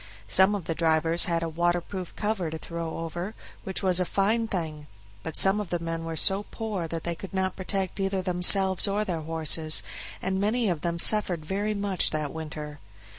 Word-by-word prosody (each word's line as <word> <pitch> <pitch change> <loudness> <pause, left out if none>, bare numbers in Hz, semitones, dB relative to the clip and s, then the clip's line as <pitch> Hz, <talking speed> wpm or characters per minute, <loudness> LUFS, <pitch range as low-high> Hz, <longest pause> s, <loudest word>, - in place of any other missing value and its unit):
Some 190 - +5
of 195 -5 -5
the 165 - -1
drivers 165 +1 +2
had 170 -1 -1
a - - -1
waterproof 175 +2 -2
cover 210 -6 -1
to 160 - -5
throw 165 0 -5
over, 175 +5 -5 0.3
which 190 +1 -3
was 185 -1 +4
a - - +3
fine 215 +5 +1
thing; 155 -7 -4 0.3
but 160 - -5
some 195 +2 +5
of 205 -4 -4
the 175 - 0
men 165 -1 -4
were 165 0 -4
so 195 +5 +2
poor 210 -7 -4
that 165 0 -5
they 170 - -1
could 195 +3 -9
not 190 0 0
protect 190 0 -3
either 195 -1 -1
themselves 190 +2 +4
or 205 +2 0
their 170 -5 -3
horses, 160 0 +1 0.4
and 190 +1 -2
many 220 +2 +1
of 165 -4 -2
them 170 -1 -2
suffered 180 -4 +5
very 205 +5 -1
much 200 -3 +1
that 155 -2 -3
winter. 150 -2 -7
175 Hz, 195 wpm, -27 LUFS, 165-195 Hz, 0.4 s, Some